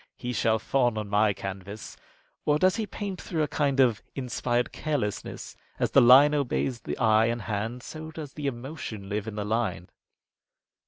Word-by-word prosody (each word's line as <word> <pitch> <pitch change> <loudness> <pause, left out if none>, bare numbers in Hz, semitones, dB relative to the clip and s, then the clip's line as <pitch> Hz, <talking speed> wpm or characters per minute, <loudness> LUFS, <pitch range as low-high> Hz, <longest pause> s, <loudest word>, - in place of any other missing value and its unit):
He 125 0 -4
shall 110 -2 +2
fawn 120 0 +1
on 105 -1 -4
my 105 +1 +3
canvas." 100 +1 -7 0.5
Or 150 0 +3
does 185 +6 +3
he 220 -2 -2
paint 200 -2 -5
through 160 -3 -1
a - - 0
kind 140 -3 0
of 120 -5 +4
inspired 125 -2 -1
carelessness, 140 -10 -3 0.2
and - - -2
as - - +1
the - - +7
line 135 +5 +8
obeys 135 -3 0
the - - -5
eye 110 -2 +4
and 115 -1 -2
hand, 110 +4 -3
so 155 0 -8
does 155 -3 -8
the 145 -2 -4
emotion 120 -6 -6
live 105 +1 -2
in 110 - -5
the 105 -1 -3
line?'" 110 -4 -1
120 Hz, 180 wpm, -27 LUFS, 110-145 Hz, 0.5 s, line